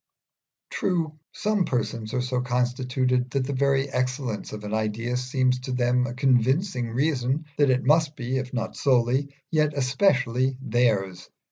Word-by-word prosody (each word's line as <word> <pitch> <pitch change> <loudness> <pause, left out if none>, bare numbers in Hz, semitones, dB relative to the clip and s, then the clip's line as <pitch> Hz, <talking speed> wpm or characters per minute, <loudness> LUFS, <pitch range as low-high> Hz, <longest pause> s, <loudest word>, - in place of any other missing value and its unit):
True, 165 -5 -1
some 210 -2 0
persons 115 -5 -2
are 125 - 0
so 125 0 -1
constituted 125 +1 0
that 135 0 -1
the 140 - -3
very 135 0 +2
excellence 125 -3 -2
of 105 0 -7
an 105 +1 -5
idea 110 +3 -1
seems 125 0 +1
to 130 +1 -6
them 125 0 +1
a 120 - -6
convincing 130 - +1
reason 135 +3 0
that 145 -2 +4
it 130 0 +2
must 155 +1 +3
be, 125 0 -2
if 130 -1 -4
not 120 -3 -3
solely, 130 +2 +1 0.2
yet 155 -1 +2
especially 130 -2 +1
theirs. 110 -8 0
125 Hz, 150 wpm, -25 LUFS, 120-140 Hz, 0.2 s, that